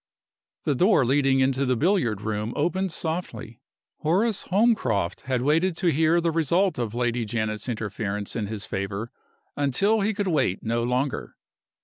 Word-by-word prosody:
The 145 Hz, -, +1 dB
door 175 Hz, -, +4 dB
leading 135 Hz, +1 st, +3 dB
into 130 Hz, +1 st, +2 dB
the 130 Hz, -1 st, +1 dB
billiard 140 Hz, -, +1 dB
room 105 Hz, +1 st, -3 dB
opened 185 Hz, +5 st, 0 dB
softly. 160 Hz, -8 st, -5 dB, 0.4 s
Horace 195 Hz, +7 st, 0 dB
Holmcroft 180 Hz, -, +1 dB
had 125 Hz, -2 st, 0 dB
waited 165 Hz, +5 st, +2 dB
to 175 Hz, -2 st, +2 dB
hear 160 Hz, +3 st, +3 dB
the 170 Hz, -1 st, +1 dB
result 165 Hz, +1 st, +1 dB
of 115 Hz, -2 st, -3 dB
Lady 120 Hz, -1 st, 0 dB
Janet's 110 Hz, +1 st, -3 dB
interference 105 Hz, -2 st, -3 dB
in 110 Hz, -3 st, -2 dB
his 105 Hz, -1 st, -4 dB
favor 100 Hz, +3 st, -4 dB, 0.4 s
until 195 Hz, -, +2 dB
he 210 Hz, +1 st, 0 dB
could 205 Hz, -1 st, -1 dB
wait 150 Hz, -, 0 dB
no 115 Hz, +1 st, 0 dB
longer. 125 Hz, +3 st, -2 dB
135 Hz, 150 wpm, -25 LUFS, 110-170 Hz, 0.4 s, door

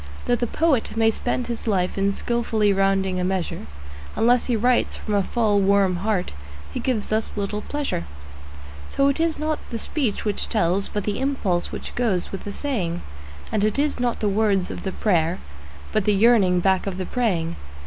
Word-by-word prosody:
Though 245 Hz, -, +3 dB
the 240 Hz, 0 st, -1 dB
poet 280 Hz, -6 st, +1 dB
may 225 Hz, 0 st, +4 dB
spend 245 Hz, +2 st, -2 dB
his 235 Hz, -1 st, -5 dB
life 185 Hz, -4 st, +1 dB
in 195 Hz, 0 st, +1 dB
skilfully 225 Hz, -3 st, +1 dB
rounding 195 Hz, -1 st, +1 dB
a -, -, 0 dB
measure, 180 Hz, -, -2 dB, 0.5 s
Unless 240 Hz, +1 st, +3 dB
he 245 Hz, -, +2 dB
writes 245 Hz, +3 st, +2 dB
from 215 Hz, -, -4 dB
a 200 Hz, -, +3 dB
full, 210 Hz, 0 st, +1 dB
warm 195 Hz, -2 st, +3 dB
heart 195 Hz, -1 st, -1 dB, 0.4 s
he -, -, -2 dB
gives 235 Hz, -6 st, -1 dB
us 220 Hz, +1 st, 0 dB
little 210 Hz, 0 st, -2 dB
pleasure. 285 Hz, -, -3 dB, 0.8 s
So 275 Hz, 0 st, +2 dB
it 280 Hz, -, -1 dB
is 325 Hz, -1 st, +1 dB
not 305 Hz, 0 st, -1 dB
the 235 Hz, -, -3 dB
speech 230 Hz, -2 st, -1 dB
which 205 Hz, -2 st, -1 dB
tells, 195 Hz, -2 st, +1 dB
but 205 Hz, -, -2 dB
the 205 Hz, 0 st, -2 dB
impulse 245 Hz, -11 st, 0 dB
which -, -, -6 dB
goes 215 Hz, -8 st, 0 dB
with 195 Hz, -, -6 dB
the 205 Hz, -, -4 dB
saying; 200 Hz, -, -2 dB, 0.5 s
And 210 Hz, -2 st, +1 dB
it 215 Hz, +3 st, +1 dB
is 290 Hz, -1 st, +1 dB
not 245 Hz, -1 st, -1 dB
the 215 Hz, -, +2 dB
words 200 Hz, -2 st, +1 dB
of -, -, -6 dB
the 190 Hz, -, -3 dB
prayer, 175 Hz, -4 st, +1 dB, 0.5 s
but 215 Hz, -, +1 dB
the 210 Hz, -, +3 dB
yearning 195 Hz, -5 st, +4 dB
back 190 Hz, +1 st, +2 dB
of 190 Hz, -2 st, -3 dB
the 185 Hz, -, -3 dB
praying. 175 Hz, -10 st, 0 dB
210 Hz, 190 wpm, -23 LUFS, 190-240 Hz, 0.8 s, may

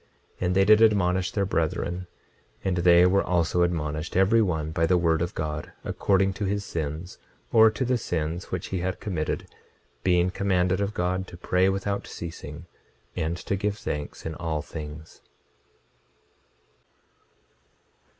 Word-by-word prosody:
26:39 -, -, -1 dB
And 90 Hz, -, 0 dB
they 95 Hz, 0 st, +5 dB
did 110 Hz, +1 st, +6 dB
admonish 95 Hz, -4 st, +3 dB
their 100 Hz, -2 st, 0 dB
brethren; 90 Hz, +1 st, -1 dB, 0.6 s
and 95 Hz, -2 st, 0 dB
they 85 Hz, 0 st, +6 dB
were 95 Hz, +2 st, +3 dB
also 90 Hz, 0 st, +1 dB
admonished, 80 Hz, -1 st, -1 dB
every 100 Hz, +4 st, +5 dB
one 80 Hz, -6 st, -1 dB
by 80 Hz, +1 st, +1 dB
the 90 Hz, -, +4 dB
word 85 Hz, -1 st, +2 dB
of 85 Hz, +1 st, -2 dB
God, 75 Hz, 0 st, -4 dB
according 95 Hz, -1 st, +1 dB
to -, -, +1 dB
his 100 Hz, +1 st, -1 dB
sins, 80 Hz, +2 st, -5 dB, 0.3 s
or 110 Hz, -1 st, +8 dB
to 110 Hz, +4 st, -2 dB
the 125 Hz, 0 st, +1 dB
sins 85 Hz, -1 st, -2 dB
which 90 Hz, +1 st, -5 dB
he 95 Hz, -, -2 dB
had 90 Hz, +2 st, -2 dB
committed, 85 Hz, -7 st, -2 dB, 0.6 s
being 90 Hz, 0 st, +3 dB
commanded 95 Hz, -1 st, +1 dB
of 100 Hz, +1 st, -2 dB
God 90 Hz, +2 st, -1 dB
to 85 Hz, -, -11 dB
pray 90 Hz, +2 st, +2 dB
without 100 Hz, +1 st, -2 dB
ceasing, 80 Hz, -1 st, -8 dB, 0.5 s
and 80 Hz, +2 st, -1 dB
to 95 Hz, +2 st, -2 dB
give 100 Hz, +1 st, -1 dB
thanks 75 Hz, -7 st, -5 dB
in 80 Hz, -, -3 dB
all 80 Hz, -2 st, -3 dB
things. 75 Hz, 0 st, -9 dB
90 Hz, 150 wpm, -26 LUFS, 80-95 Hz, 0.6 s, or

